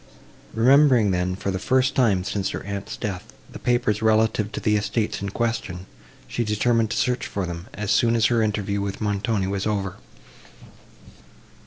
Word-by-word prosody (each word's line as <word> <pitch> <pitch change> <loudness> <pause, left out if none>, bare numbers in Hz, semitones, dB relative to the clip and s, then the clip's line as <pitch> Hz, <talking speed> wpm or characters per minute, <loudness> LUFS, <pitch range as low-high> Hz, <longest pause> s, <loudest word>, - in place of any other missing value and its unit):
Remembering 125 -2 +5
then, 90 0 0
for 100 0 -3
the 95 - -3
first 130 +6 +2
time 105 -8 +2
since 100 +1 -2
her - - -5
aunt's 100 +2 -5
death, 95 -4 -5 0.2
the - - -9
papers 120 -4 +1
relative 110 -1 +2
to - - -3
the 105 -1 +1
estates 105 +1 -1
in 100 - -3
question, 100 -5 -3 0.4
she 120 - -2
determined 115 +1 +1
to - - -2
search 125 0 0
for 100 -2 -3
them, 85 +2 -6
as 105 0 -2
soon 115 0 +3
as 115 -1 +3
her 120 -1 +3
interview 105 -2 -1
with 100 -1 -4
Montoni 105 -1 -1
was 100 +1 -2
over. 100 -3 -2
105 Hz, 170 wpm, -23 LUFS, 100-115 Hz, 0.4 s, Remembering